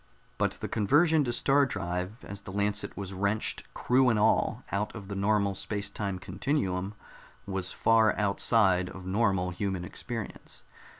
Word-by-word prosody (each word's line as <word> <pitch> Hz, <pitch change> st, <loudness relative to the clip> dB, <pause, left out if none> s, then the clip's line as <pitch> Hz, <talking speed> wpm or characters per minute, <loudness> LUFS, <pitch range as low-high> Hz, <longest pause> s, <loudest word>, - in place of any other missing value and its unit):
But -, -, +1 dB
the -, -, -2 dB
conversion 150 Hz, -, +3 dB
to 120 Hz, -, -1 dB
star 140 Hz, +3 st, +3 dB
drive, 95 Hz, 0 st, -4 dB
as 100 Hz, 0 st, -8 dB
the 95 Hz, -, -9 dB
Lancet 100 Hz, +1 st, -1 dB
was 100 Hz, -1 st, -5 dB
wrenched, 100 Hz, +3 st, -1 dB
crew 130 Hz, +1 st, +3 dB
and 115 Hz, -, +2 dB
all, 105 Hz, +1 st, +2 dB
out 105 Hz, +3 st, -2 dB
of 100 Hz, -3 st, -8 dB
the 100 Hz, -, -4 dB
normal 100 Hz, 0 st, +2 dB
space 100 Hz, +1 st, -3 dB
time 100 Hz, -2 st, -3 dB
continuum, 95 Hz, -3 st, -2 dB, 0.5 s
was 95 Hz, -2 st, -2 dB
far 115 Hz, -1 st, +3 dB
outside 100 Hz, -2 st, +2 dB
of 95 Hz, -1 st, -10 dB
normal 95 Hz, -2 st, +1 dB
human 95 Hz, -1 st, -3 dB
experience. 115 Hz, +3 st, -7 dB
100 Hz, 155 wpm, -29 LUFS, 95-110 Hz, 0.5 s, conversion